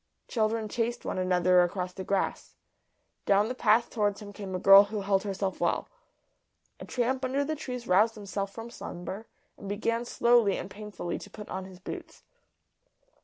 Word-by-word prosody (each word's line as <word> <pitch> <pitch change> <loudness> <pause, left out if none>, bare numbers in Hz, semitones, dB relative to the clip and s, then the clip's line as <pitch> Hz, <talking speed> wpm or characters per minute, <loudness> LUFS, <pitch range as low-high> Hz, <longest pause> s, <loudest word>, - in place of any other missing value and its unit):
Children 220 -1 0
chased 235 +2 -2
one - - -2
another 180 0 +4
across 180 +1 -1
the 190 - -6
grass. 195 0 -2 0.7
Down 205 +2 +4
the - - -1
path 230 -1 +3
towards 205 -3 0
him 205 -2 -10
came 195 -2 -6
a - - -2
girl 195 +2 +9
who 205 0 -4
held 195 -1 +2
herself 195 -1 -3
well. - - 0 0.9
A - - -8
tramp 255 +1 -1
under 270 +2 0
the 310 +2 -2
trees 250 -5 -6
roused 210 +5 +4
himself 200 -1 -4
from 230 +3 -8
slumber, 190 +5 -7 0.3
and 200 - -7
began 230 +3 -1
slowly 235 -4 +3
and 195 - -6
painfully 205 -4 -5
to 205 - -11
put 210 +1 -10
on 190 0 -4
his 190 -1 -12
boots. 185 - -8
205 Hz, 170 wpm, -29 LUFS, 190-230 Hz, 0.9 s, girl